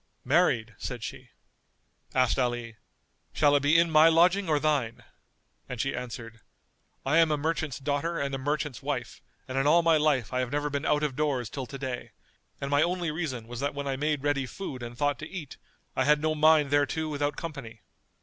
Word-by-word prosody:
"Married," 115 -1 +2
said 120 -3 -5
she. - - -7 0.9
Asked 130 0 +3
Ali, 120 -2 -2 0.6
"Shall 145 -1 +4
it - - +5
be 145 +4 +4
in 170 0 +3
my 155 +1 +7
lodging 175 +3 +3
or 150 -2 +3
thine?"[FN#228] 145 -7 0 0.7
and 125 - -5
she 135 - -1
answered, 115 -2 -7 0.7
"I 150 +5 +4
am 165 -1 +5
a 150 - +1
merchant's 155 -1 -2
daughter 145 +4 -2
and 140 -1 -2
a 135 - -2
merchant's 145 -1 -2
wife 135 -4 -4 0.3
and 130 0 -2
in 135 - +1
all 170 +3 +5
my 165 -1 +5
life 145 -6 +1
I 125 - +1
have 125 -1 -2
never 145 0 -1
been 140 +1 -2
out 150 0 +2
of 145 -4 -1
doors 135 -7 -1
till 130 -3 -5
to 135 - -7
day, 130 -2 -5 0.5
and 140 0 -4
my 145 +1 +4
only 175 -1 0
reason 150 -8 -4
was 120 0 -7
that 140 +1 -2
when 140 0 -4
I 135 - -1
made 150 0 -1
ready 140 -2 0
food 130 -1 -7
and 120 0 -7
thought 145 +1 0
to 155 - -7
eat, 170 -7 -8 0.4
I - - +1
had 150 0 +4
no 155 +1 0
mind 155 -2 +4
thereto 145 +2 +1
without 145 -1 -1
company. 135 -10 -7
145 Hz, 205 wpm, -28 LUFS, 130-155 Hz, 0.9 s, my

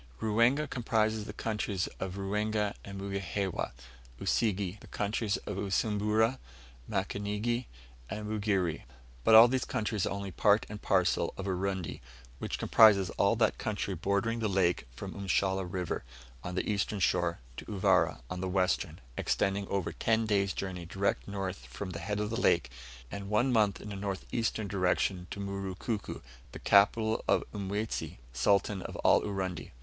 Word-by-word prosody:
Ruwenga 115 +7 +3
comprises 110 -3 0
the - - -6
countries 105 -3 -2
of 95 -1 -4
Ruwenga 105 +1 0
and 100 0 -7
Mugihewa; 100 -3 -2 0.5
Usige, 100 -3 0
the - - -14
countries 105 0 -1
of 105 - -4
Usumbura, 105 +4 +1 0.5
Mukanigi, 105 +4 -1 0.4
and 105 0 -4
Mugere. 100 -6 0 0.4
But 110 - +6
all 115 +2 +11
these 130 +1 0
countries 105 -2 -1
are - - -3
only 100 -1 -4
part 105 +3 +3
and 105 0 -7
parcel 90 -6 +2
of 95 - -4
Urundi, 95 -2 -2 0.4
which - - -3
comprises 100 -5 +6
all 100 +3 +2
that 110 -1 +2
country 105 -4 -2
bordering 100 +6 0
the 110 - +1
lake 90 -7 +1
from - - -6
Mshala 95 -2 0
River, 90 -3 -2 0.4
on 90 - -5
the - - -1
eastern 105 0 0
shore, 85 -2 +2 0.2
to - - -7
Uvira, 95 - +2
on 90 +5 -5
the 95 - -2
western, 90 -3 0 0.2
extending 100 +7 0
over 100 -3 -1
ten 115 0 +1
days' 100 -3 +1
journey 90 -3 -5
direct 100 +3 -1
north 95 -2 -4
from 95 -2 -6
the 85 - -5
head 105 +4 -2
of 105 +1 -2
the 115 - -1
lake, 65 -7 +3 0.4
and 100 -1 -6
one 120 +5 +2
month 105 -4 +3
in 105 - -8
a - - -4
northeastern 105 +2 -2
direction 90 -2 0
to - - -6
Murukuko, 100 +2 -4 0.3
the - - -6
capital 110 +2 +4
of - - +3
Mwezi, 105 +2 -3 0.2
Sultan 100 +5 +2
of - - -7
all - - +6
Urundi. 95 -3 -3
100 Hz, 155 wpm, -31 LUFS, 95-110 Hz, 0.5 s, all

